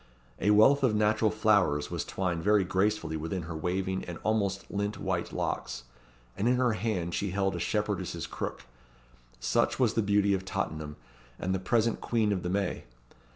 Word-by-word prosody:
A 100 Hz, -, +1 dB
wreath 110 Hz, +7 st, +6 dB
of 125 Hz, -5 st, +3 dB
natural 110 Hz, +1 st, +3 dB
flowers 100 Hz, -9 st, +2 dB
was -, -, -2 dB
twined 90 Hz, -3 st, -2 dB
very 105 Hz, -1 st, +4 dB
gracefully 95 Hz, -2 st, 0 dB
within 80 Hz, +4 st, -3 dB
her 80 Hz, 0 st, -6 dB
waving 95 Hz, +3 st, -2 dB
and 85 Hz, -1 st, -6 dB
almost 100 Hz, -3 st, 0 dB
lint 100 Hz, +1 st, -2 dB
white -, -, -2 dB
locks, -, -, -3 dB, 0.5 s
and 105 Hz, -, 0 dB
in 125 Hz, -, +4 dB
her 125 Hz, -1 st, +2 dB
hand 100 Hz, -6 st, -2 dB
she 100 Hz, -, -1 dB
held 95 Hz, +1 st, 0 dB
a -, -, -3 dB
shepherdess's 105 Hz, -4 st, -2 dB
crook. -, -, -5 dB, 0.8 s
Such -, -, +1 dB
was 120 Hz, -4 st, +3 dB
the 115 Hz, -, +2 dB
Beauty 100 Hz, -1 st, +3 dB
of 95 Hz, -1 st, -1 dB
Tottenham, 75 Hz, -5 st, -3 dB, 0.4 s
and 95 Hz, +1 st, -2 dB
the 95 Hz, -, 0 dB
present 115 Hz, +4 st, +1 dB
Queen 110 Hz, -3 st, +1 dB
of 95 Hz, -3 st, 0 dB
the 90 Hz, -, -3 dB
May. 100 Hz, 0 st, -1 dB
100 Hz, 175 wpm, -29 LUFS, 90-105 Hz, 0.8 s, wreath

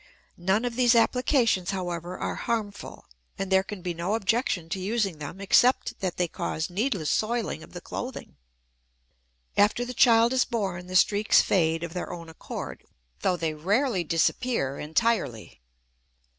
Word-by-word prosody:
None 190 Hz, +6 st, +1 dB
of 240 Hz, -1 st, -3 dB
these 245 Hz, -1 st, +4 dB
applications, 230 Hz, -4 st, +2 dB
however, 175 Hz, -2 st, -4 dB
are -, -, -3 dB
harmful, 215 Hz, -4 st, -4 dB, 0.3 s
and 195 Hz, 0 st, -4 dB
there 190 Hz, 0 st, +5 dB
can 195 Hz, -1 st, -8 dB
be 180 Hz, -2 st, -2 dB
no 175 Hz, +5 st, -1 dB
objection 220 Hz, -5 st, 0 dB
to 190 Hz, -, -3 dB
using 195 Hz, -4 st, -1 dB
them 150 Hz, +5 st, -7 dB
except 240 Hz, +5 st, +3 dB
that 185 Hz, -3 st, -3 dB
they 180 Hz, -, +1 dB
cause 160 Hz, +1 st, -3 dB
needless 200 Hz, -, -1 dB
soiling 225 Hz, -6 st, -1 dB
of -, -, -14 dB
the 175 Hz, -, -7 dB
clothing. 250 Hz, +7 st, -6 dB, 1.2 s
After 210 Hz, +4 st, +3 dB
the 250 Hz, -, -6 dB
child 235 Hz, -1 st, +5 dB
is 260 Hz, -, +4 dB
born 190 Hz, -6 st, -3 dB
the 185 Hz, -, -6 dB
streaks 205 Hz, +3 st, +4 dB
fade 165 Hz, -3 st, +1 dB
of 170 Hz, -1 st, -5 dB
their 180 Hz, -, -4 dB
own 170 Hz, -1 st, -8 dB
accord, 160 Hz, -, -7 dB, 0.4 s
though 180 Hz, -, +1 dB
they 160 Hz, -2 st, -1 dB
rarely 195 Hz, -, +1 dB
disappear 165 Hz, -, 0 dB
entirely. 160 Hz, -, -1 dB
195 Hz, 155 wpm, -26 LUFS, 175-230 Hz, 1.2 s, there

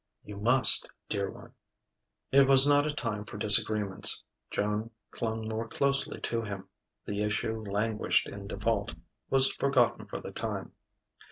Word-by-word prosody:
"You 105 Hz, -1 st, -10 dB
must, 120 Hz, +5 st, +5 dB, 0.2 s
dear 100 Hz, -1 st, -2 dB
one." -, -, -13 dB, 0.8 s
It 135 Hz, 0 st, +5 dB
was 135 Hz, 0 st, +6 dB
not 145 Hz, +1 st, +3 dB
a -, -, -1 dB
time 115 Hz, -7 st, -4 dB
for 105 Hz, -1 st, -10 dB
disagreements. 105 Hz, -2 st, +4 dB, 0.3 s
Joan 105 Hz, +2 st, -2 dB, 0.2 s
clung 110 Hz, -1 st, -4 dB
more 110 Hz, +1 st, -4 dB
closely 140 Hz, +3 st, -1 dB
to 115 Hz, -1 st, -2 dB
him. 100 Hz, -3 st, -7 dB, 0.4 s
The 105 Hz, 0 st, -4 dB
issue 110 Hz, +1 st, -2 dB
languished 105 Hz, +2 st, 0 dB
in 100 Hz, 0 st, -9 dB
default, 100 Hz, -3 st, -2 dB, 0.3 s
was 135 Hz, 0 st, +4 dB
forgotten 135 Hz, -4 st, 0 dB
for -, -, -6 dB
the -, -, -9 dB
time.... -, -, -5 dB
110 Hz, 145 wpm, -28 LUFS, 105-125 Hz, 0.8 s, was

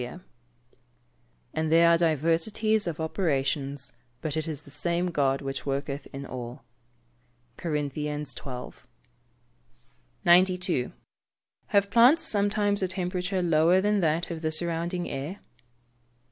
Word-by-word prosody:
[Verse: 125 Hz, +8 st, -6 dB, 1.3 s
"And 160 Hz, 0 st, -1 dB
there 165 Hz, +1 st, +6 dB
are 170 Hz, -, +6 dB
diversities 170 Hz, +7 st, +1 dB
of 165 Hz, -2 st, -3 dB
operations, 140 Hz, -4 st, -1 dB, 0.3 s
but 155 Hz, -2 st, -3 dB
it 155 Hz, 0 st, -2 dB
is 155 Hz, -2 st, -5 dB
the 140 Hz, -, -14 dB
same 170 Hz, +4 st, -1 dB
God 140 Hz, -3 st, +1 dB
which 135 Hz, -1 st, -4 dB
worketh 140 Hz, +1 st, -3 dB
in 140 Hz, 0 st, -6 dB
all." 120 Hz, -2 st, -7 dB, 0.9 s
CORINTHIANS 150 Hz, -2 st, -2 dB
XII.] 125 Hz, 0 st, -7 dB, 1.5 s
92. 180 Hz, -5 st, +3 dB, 0.8 s
_Have 200 Hz, 0 st, +3 dB
plants 255 Hz, +8 st, +6 dB
sometimes 205 Hz, -4 st, +1 dB
a 190 Hz, -, +1 dB
temperature 180 Hz, 0 st, -2 dB
lower 170 Hz, +2 st, +4 dB
than 205 Hz, +1 st, +2 dB
that 165 Hz, 0 st, 0 dB
of 165 Hz, -1 st, -5 dB
the 160 Hz, -1 st, -1 dB
surrounding 170 Hz, +2 st, -1 dB
air? 145 Hz, +8 st, -5 dB
165 Hz, 120 wpm, -27 LUFS, 145-180 Hz, 1.5 s, there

